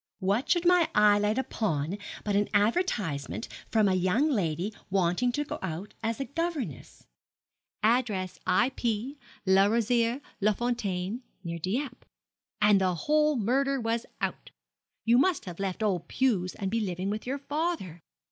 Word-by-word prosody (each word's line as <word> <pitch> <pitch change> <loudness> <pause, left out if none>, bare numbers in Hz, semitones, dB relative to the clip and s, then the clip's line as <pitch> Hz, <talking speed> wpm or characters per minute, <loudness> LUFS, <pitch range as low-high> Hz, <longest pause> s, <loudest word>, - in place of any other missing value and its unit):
What 210 +8 0
should 345 -1 +2
my 355 -2 +5
eye 210 -1 +6
light 210 +2 +1
upon 195 - -1 0.2
but 205 -1 0
an 205 +1 +2
advertisement 205 - 0 0.2
from 215 -2 +3
a 190 - +3
young 185 - +2
lady 185 - -1 0.2
wanting 190 +6 +2
to 295 - 0
go - - -6
out 190 +2 -5
as 225 +1 -2
a 275 - -1
governess 330 -1 -4 0.8
address 215 -5 +1
I.P., 240 +5 0 0.3
Le 195 +1 +5
Rosier, 235 +2 +2 0.2
Les 210 +1 +2
Fontaines, 215 -3 -2 0.2
near 170 -1 -4
Dieppe 235 - -3 0.5
and 210 -2 +5
the 185 -1 +2
whole 300 - +2
murder 270 +4 +1
was 230 0 -1
out. - - -3 0.6
You 235 +2 +5
must 355 +3 +2
have 180 -1 -8
left 195 +2 -2
old 185 -5 0
Pew's 205 -9 +1
and 195 -2 -3
be 230 - +1
living 190 -1 -2
with 215 +3 -4
your 270 +2 -1
father. 290 - -3
215 Hz, 150 wpm, -28 LUFS, 190-260 Hz, 0.8 s, eye